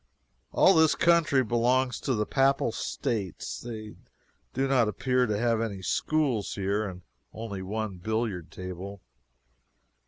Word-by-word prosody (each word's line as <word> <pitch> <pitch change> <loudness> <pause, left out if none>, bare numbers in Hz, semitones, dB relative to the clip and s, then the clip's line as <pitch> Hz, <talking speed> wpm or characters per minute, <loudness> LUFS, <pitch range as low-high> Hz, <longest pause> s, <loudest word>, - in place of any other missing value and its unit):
All 190 - +6
this 160 -3 +5
country 165 -6 +4
belongs 120 +2 +1
to 130 - -1
the 105 0 0
Papal 135 -2 +2
States. 105 -4 -3
They 110 -3 -7 0.6
do 135 +2 0
not 130 -4 +3
appear 125 +3 +1
to 105 -1 0
have 115 0 +1
any 100 -4 -4
schools 130 - 0
here, 100 +2 -1
and 90 -1 -10 0.3
only 110 -4 -5
one 105 0 -3
billiard 105 -3 -2
table. 95 +2 -7
110 Hz, 130 wpm, -28 LUFS, 100-130 Hz, 0.6 s, All